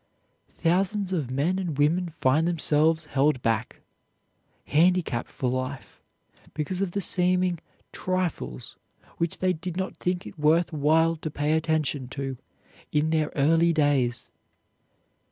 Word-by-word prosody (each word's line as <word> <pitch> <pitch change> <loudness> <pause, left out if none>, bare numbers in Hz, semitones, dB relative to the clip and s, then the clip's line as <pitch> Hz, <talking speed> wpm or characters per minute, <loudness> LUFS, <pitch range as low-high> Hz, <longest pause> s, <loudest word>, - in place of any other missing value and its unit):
Thousands 190 +3 0
of 150 -8 -2
men 150 +9 0
and 170 -7 -3
women 170 +5 +2
find 155 0 +1
themselves 160 -1 +2
held 145 -1 +1
back, 115 +1 -1 0.8
handicapped 165 -5 +1
for 130 - -3
life 130 +1 -4 0.5
because 160 +5 -2
of 185 -3 -2
the 200 - -1
seeming 180 -1 +2 0.3
trifles 185 -9 -3 0.4
which 170 -1 0
they 185 0 +1
did 180 +1 -6
not 190 0 -3
think 180 +1 -2
it - - -11
worth 160 +3 +2
while 160 +3 +3
to 155 - -5
pay 150 +1 -1
attention 155 -4 0
to 135 0 -5 0.6
in 150 +1 +1
their 155 -2 +1
early 165 +4 +3
days. 140 -6 0
160 Hz, 130 wpm, -26 LUFS, 145-180 Hz, 0.8 s, while